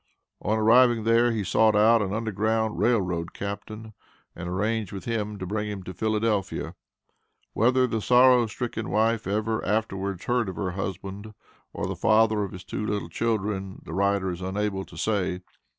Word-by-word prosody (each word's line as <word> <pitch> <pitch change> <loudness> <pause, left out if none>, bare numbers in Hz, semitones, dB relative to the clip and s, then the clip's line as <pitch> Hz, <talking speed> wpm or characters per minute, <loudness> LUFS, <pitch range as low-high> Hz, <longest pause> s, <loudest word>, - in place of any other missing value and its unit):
On 110 +2 0
arriving 115 +1 +5
there, 115 +2 +4
he 110 -3 -1
sought 110 +3 +3
out 110 +2 +5
an 95 -2 -2
Underground 110 +1 -1
Rail 120 -1 +3
Road 85 -3 -3
captain, 110 +2 -6 0.4
and 85 0 -6
arranged 105 +2 -1
with 95 - -7
him 105 -3 -2
to 95 - -5
bring 105 +3 -2
him 100 -2 -5
to 95 - -7
Philadelphia. 110 0 -1 0.8
Whether 130 +3 +3
the 115 -3 -2
sorrow 125 0 +5
stricken 110 0 -4
wife 110 0 +1
ever 110 +2 -1
afterwards 100 -3 -2
heard 120 -4 +1
of 95 - -6
her 95 -1 -2
husband, 100 +3 -6 0.4
or - - -4
the - - -3
father 110 -1 +3
of 100 - -5
his 95 0 -9
two 105 - -5
little 105 -5 -2
children, 100 -2 -2
the - - -7
writer 100 0 +1
is 90 +1 -7
unable 95 +1 -2
to - - -14
say. 95 -4 -1
105 Hz, 170 wpm, -26 LUFS, 95-110 Hz, 0.8 s, arriving